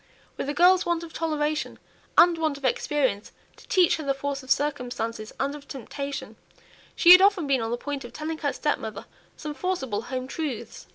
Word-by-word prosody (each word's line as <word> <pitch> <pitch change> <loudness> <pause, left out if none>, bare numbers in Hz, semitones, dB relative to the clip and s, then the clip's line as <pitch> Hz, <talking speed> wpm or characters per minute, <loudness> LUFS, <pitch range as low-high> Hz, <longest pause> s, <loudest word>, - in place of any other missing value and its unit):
With 275 - -4
a - - -1
girl's 360 +3 +5
want 340 -1 -1
of 330 - -10
toleration, 305 -2 -2 0.4
and 345 0 +7
want 310 -3 0
of 275 - -7
experience 260 -5 0 0.3
to - - -17
teach 365 -3 +4
her 315 - -6
the 275 -1 0
force 280 0 -3
of 260 - -15
circumstances, 245 -6 -1
and 275 +1 0
of 290 -1 -11
temptation, 275 +2 -6 0.6
she 345 - +7
had 365 +1 +11
often 390 -4 +4
been 270 -3 +1
on 225 - -2
the 240 - -1
point 280 +2 -5
of 240 - -9
telling 315 +1 -5
her 285 -2 0
stepmother 220 -10 -3 0.3
some 300 -2 -5
forcible 270 - -2
home 255 +2 -4
truths. 285 -3 -5
285 Hz, 190 wpm, -26 LUFS, 260-320 Hz, 0.6 s, had